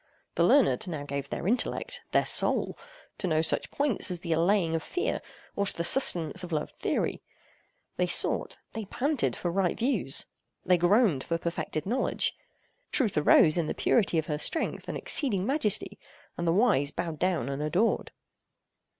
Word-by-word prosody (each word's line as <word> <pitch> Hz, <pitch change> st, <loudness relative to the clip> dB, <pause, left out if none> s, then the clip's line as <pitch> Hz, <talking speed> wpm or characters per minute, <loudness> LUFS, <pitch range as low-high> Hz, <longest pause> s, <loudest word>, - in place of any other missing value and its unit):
The -, -, +1 dB
learned 270 Hz, -6 st, +3 dB
now 155 Hz, -5 st, -4 dB
gave 140 Hz, -1 st, -5 dB
their -, -, -4 dB
intellect—their 240 Hz, +4 st, 0 dB
soul—to -, -, 0 dB
no 160 Hz, -1 st, +1 dB
such 160 Hz, -, 0 dB
points 280 Hz, -6 st, +1 dB
as 180 Hz, -2 st, -3 dB
the 170 Hz, -2 st, -1 dB
allaying 170 Hz, +1 st, +2 dB
of 165 Hz, -, -1 dB
fear, 365 Hz, -, -2 dB, 0.3 s
or 200 Hz, 0 st, 0 dB
to -, -, -4 dB
the 170 Hz, -, -1 dB
sustenance 175 Hz, -, +2 dB
of 180 Hz, -, -7 dB
loved 150 Hz, -1 st, -3 dB
theory. -, -, -2 dB, 0.8 s
They -, -, +1 dB
sought—they 220 Hz, -2 st, 0 dB
panted 275 Hz, +6 st, -1 dB
for 175 Hz, -, -3 dB
right 185 Hz, -1 st, 0 dB
views. 230 Hz, -, +1 dB, 0.4 s
They 180 Hz, -1 st, +3 dB
groaned 175 Hz, -, +3 dB
for 165 Hz, -, -2 dB
perfected 165 Hz, -2 st, -4 dB
knowledge. 245 Hz, +7 st, 0 dB, 0.6 s
Truth 235 Hz, -9 st, +1 dB
arose 155 Hz, +2 st, +5 dB
in 160 Hz, -, -1 dB
the -, -, -3 dB
purity 195 Hz, -7 st, +2 dB
of 160 Hz, -, 0 dB
her 150 Hz, -1 st, -3 dB
strength 320 Hz, -, -3 dB
and -, -, -4 dB
exceeding 205 Hz, -11 st, +1 dB
majesty, 225 Hz, -6 st, 0 dB, 0.4 s
and 170 Hz, -, -3 dB
the -, -, +3 dB
wise 185 Hz, -, +3 dB
bowed 160 Hz, 0 st, -5 dB
down 175 Hz, -8 st, 0 dB
and 140 Hz, +1 st, -4 dB
adored. 180 Hz, +9 st, 0 dB
180 Hz, 160 wpm, -28 LUFS, 160-225 Hz, 0.8 s, arose